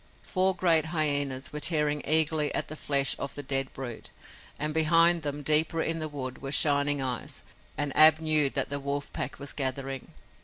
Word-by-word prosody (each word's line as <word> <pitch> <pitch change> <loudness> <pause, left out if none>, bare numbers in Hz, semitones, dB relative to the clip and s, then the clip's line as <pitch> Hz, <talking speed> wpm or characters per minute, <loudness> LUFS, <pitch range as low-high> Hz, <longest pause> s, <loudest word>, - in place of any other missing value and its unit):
Four 190 -1 0
great 165 -3 +1
hyenas 145 -5 -1
were 150 - -5
tearing 150 -2 +1
eagerly 155 -1 +2
at - - -2
the 155 - -7
flesh 140 -2 +1
of 140 - -6
the 145 - -7
dead 135 0 -1
brute, 125 -4 -9 0.5
and 150 +1 -1
behind 165 +2 +4
them, 145 -1 -5
deeper 155 +2 +3
in 165 0 -1
the 155 -1 -4
wood, 130 -3 -7
were 135 0 -6
shining 145 0 +2
eyes, 125 -2 -3 0.3
and 145 -2 -2
Ab 155 0 +7
knew 155 -3 +2
that - - 0
the 140 - -2
wolf 140 +1 -5
pack 125 - -4
was 140 -1 -4
gathering. 135 -1 -4
145 Hz, 185 wpm, -27 LUFS, 140-155 Hz, 0.5 s, Ab